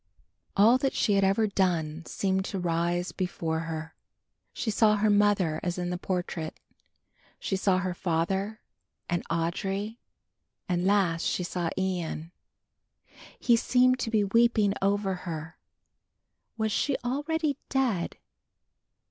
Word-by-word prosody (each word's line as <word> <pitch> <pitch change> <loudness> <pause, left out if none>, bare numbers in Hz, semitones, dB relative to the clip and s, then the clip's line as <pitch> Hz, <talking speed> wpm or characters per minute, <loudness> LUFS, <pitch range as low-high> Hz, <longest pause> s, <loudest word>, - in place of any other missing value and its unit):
All 225 +6 +6
that 270 0 0
she 210 - +2
had 195 0 +3
ever 195 +3 +3
done 170 -6 0
seemed 190 -1 0
to 195 - -4
rise 175 0 0
before 165 -3 -2
her. 160 -1 -5 0.6
She 220 - -2
saw 210 0 +4
her 210 +1 +2
mother 205 -6 +3
as 175 0 -2
in 180 0 -2
the 180 - -2
portrait. 175 -4 -3 0.8
She 195 - -2
saw 190 -1 +2
her 185 -1 -1
father 190 +6 -1 0.5
and 175 0 -1
Audry, 195 +6 -2 0.7
and 180 0 0
last 190 -5 +2
she 180 - 0
saw 175 -1 -2
Ian. 175 -3 -2 1.1
He 240 - +4
seemed 255 +2 +3
to 235 - -2
be 215 -2 +2
weeping 215 0 +3
over 200 0 +1 0.2
her! 160 0 -6 1.0
Was 220 -1 0
she 275 +6 +1
already 295 +3 0
dead? 245 -10 0
190 Hz, 130 wpm, -28 LUFS, 175-215 Hz, 1.1 s, All